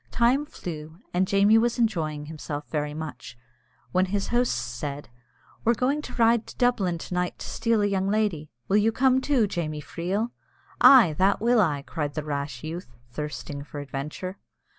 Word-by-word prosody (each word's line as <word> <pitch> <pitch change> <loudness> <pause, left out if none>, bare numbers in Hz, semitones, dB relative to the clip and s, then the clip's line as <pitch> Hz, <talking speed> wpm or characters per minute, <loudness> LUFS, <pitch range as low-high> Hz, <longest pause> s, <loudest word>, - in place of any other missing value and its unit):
Time 255 +5 +2
flew, 160 - -7 0.2
and 185 +1 +2
Jamie 200 +3 +5
was 240 +2 +1
enjoying 160 -10 0
himself 150 -1 -6
very 150 -1 -2
much, 150 -6 -7 0.5
when 185 +1 +2
his 200 +1 -2
hosts 245 0 +2
said, 140 +5 -5 0.5
"We're 235 +1 +3
going 275 +6 +1
to - - -9
ride 230 -1 +3
to - - -11
Dublin 210 -9 +2
to 165 - -7
night 180 0 -1
to - - -7
steal 230 -3 +1
a - - +3
young 195 -1 0
lady. 200 -8 0 0.2
Will 200 - +3
you 215 +2 +3
come 260 +2 +3
too, 260 -5 +2
Jamie 160 -6 -3
Freel?" 185 +10 -2 0.5
"Ay, 235 - +8
that 195 +1 +3
will 235 +1 +4
I!" 145 -7 0
cried 145 -1 -4
the 155 - -2
rash 140 -3 -4
youth, 160 -5 -7 0.2
thirsting 145 +1 -5
for 145 0 -8
adventure. 145 +7 -5
185 Hz, 175 wpm, -26 LUFS, 150-225 Hz, 0.5 s, Ay